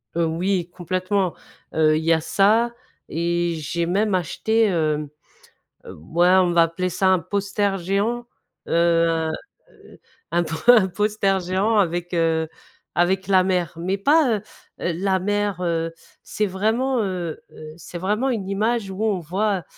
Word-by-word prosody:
Heu, 170 Hz, 0 st, +2 dB
oui 175 Hz, +2 st, -1 dB
complètement, 185 Hz, +1 st, -1 dB, 0.4 s
heu, 155 Hz, -1 st, +3 dB
il 160 Hz, -, -3 dB
y 165 Hz, -, +2 dB
a 160 Hz, -, +2 dB
ça 220 Hz, +7 st, +2 dB, 0.4 s
et 170 Hz, +1 st, -1 dB
j'ai 160 Hz, +2 st, -2 dB
même 200 Hz, +4 st, 0 dB
acheté, 220 Hz, +6 st, +1 dB
hem, 155 Hz, -6 st, 0 dB, 0.8 s
heu, -, -, -10 dB
ouais 165 Hz, -, +1 dB
on 185 Hz, -1 st, +4 dB
va 170 Hz, -1 st, +5 dB
appeler 165 Hz, +3 st, -1 dB
ça 180 Hz, +2 st, +1 dB
un 185 Hz, -1 st, +4 dB
poster 200 Hz, +2 st, -1 dB
géant, 205 Hz, +7 st, -1 dB, 0.4 s
heu, 170 Hz, 0 st, +3 dB
un, 160 Hz, -1 st, -1 dB, 0.4 s
heu, -, -, -18 dB, 0.3 s
un 175 Hz, +1 st, +2 dB
po 165 Hz, 0 st, -4 dB
un 220 Hz, -6 st, +8 dB
poster 200 Hz, 0 st, 0 dB
géant 190 Hz, +5 st, 0 dB
avec, 175 Hz, -2 st, 0 dB
heu, 165 Hz, -1 st, +1 dB, 0.5 s
avec 185 Hz, +3 st, +1 dB
la 190 Hz, -2 st, +5 dB
mer 180 Hz, -4 st, 0 dB
mais 185 Hz, +4 st, -2 dB
pas, 280 Hz, 0 st, +3 dB
heu 200 Hz, -, -13 dB, 0.4 s
heu, 175 Hz, -, -1 dB
la 190 Hz, +2 st, 0 dB
mer, 205 Hz, -1 st, -1 dB
heu, 165 Hz, -1 st, -1 dB, 0.3 s
c'est 210 Hz, -, -2 dB
vraiment, 225 Hz, +6 st, 0 dB
heu 180 Hz, -5 st, -4 dB
heu -, -, -12 dB
,c'est 175 Hz, +1 st, -9 dB
vraiment 210 Hz, +9 st, 0 dB
une 200 Hz, -6 st, -3 dB
image 210 Hz, +1 st, -1 dB
où 190 Hz, +3 st, -5 dB
on 210 Hz, -4 st, +1 dB
voit, 190 Hz, +3 st, -1 dB
185 Hz, 160 wpm, -22 LUFS, 170-205 Hz, 0.8 s, un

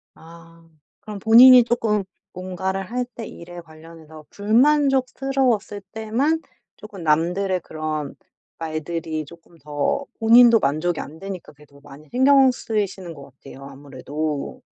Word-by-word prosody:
아. 165 Hz, 0 st, -17 dB, 0.3 s
그럼 210 Hz, -2 st, -8 dB
본인이 245 Hz, +4 st, +8 dB
조금 220 Hz, -4 st, -1 dB, 0.3 s
뭔가를 190 Hz, +1 st, -4 dB
할 250 Hz, +1 st, -2 dB
때 230 Hz, -, -7 dB
일에 175 Hz, +1 st, -11 dB
관련해서 160 Hz, -1 st, -15 dB
불만족스러웠을 260 Hz, -2 st, +1 dB
때만 250 Hz, +9 st, -1 dB, 0.4 s
조금 205 Hz, -5 st, -11 dB
남들의 180 Hz, +5 st, 0 dB
그런 155 Hz, -3 st, -5 dB, 0.4 s
말들이 160 Hz, 0 st, -5 dB
조금 170 Hz, +2 st, -18 dB
더 150 Hz, -, -3 dB
본인도 230 Hz, 0 st, +6 dB
만족이 155 Hz, +5 st, -1 dB
안 155 Hz, +3 st, -9 dB
되니까 195 Hz, -1 st, -8 dB
그래도 140 Hz, -1 st, -20 dB
많이 145 Hz, +2 st, -15 dB
신경 265 Hz, +1 st, +5 dB
쓰이시는 200 Hz, -7 st, -4 dB
것 140 Hz, -2 st, -14 dB
같아요 135 Hz, +1 st, -12 dB
아무래도. 145 Hz, +2 st, -6 dB
180 Hz, 285 characters per minute, -21 LUFS, 155-225 Hz, 0.4 s, 본인이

